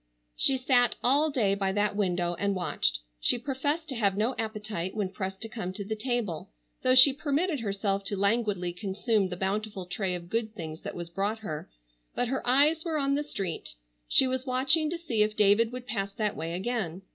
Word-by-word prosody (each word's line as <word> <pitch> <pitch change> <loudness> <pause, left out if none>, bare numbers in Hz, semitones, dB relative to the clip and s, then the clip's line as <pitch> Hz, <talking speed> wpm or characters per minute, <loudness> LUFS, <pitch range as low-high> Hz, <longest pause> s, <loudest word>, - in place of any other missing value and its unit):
She 270 - +4
sat 250 -1 +3
all 285 +5 +4
day 225 -9 +2
by 195 -1 0
that 205 0 +1
window 180 -4 0
and 200 -1 +1
watched. - - 0 0.2
She - - +2
professed 285 +5 -2
to 265 - -3
have 200 -4 +1
no 225 +5 +1
appetite 210 -4 -3
when 205 -3 -1
pressed 190 0 -5
to 225 - -4
come 215 -5 -5
to 200 +1 -5
the 220 +2 -2
table, 215 - -2 0.3
though 255 0 +4
she 260 +2 +9
permitted 295 +3 0
herself 200 -2 -1
to 200 - -2
languidly 200 -3 +1
consume 200 +2 0
the 180 - -5
bountiful 195 0 -2
tray 180 0 -2
of 170 -1 -7
good 220 +2 -2
things 160 -4 -6
that - - -6
was 170 -1 -6
brought 200 +5 -1
her, 150 - -5 0.5
but 245 - 0
her 265 - -1
eyes 295 +5 +4
were 325 -3 -1
on 275 -1 +1
the 285 - +1
street. 195 - -5 0.3
She 265 - +6
was 260 +1 -2
watching 270 +5 +3
to 340 - -3
see 260 -11 -1
if 210 0 +2
David 210 +3 +4
would 250 0 -7
pass 200 -4 -2
that 210 -1 -1
way 165 +1 -4
again. 195 -3 -3
215 Hz, 205 wpm, -28 LUFS, 190-255 Hz, 0.5 s, she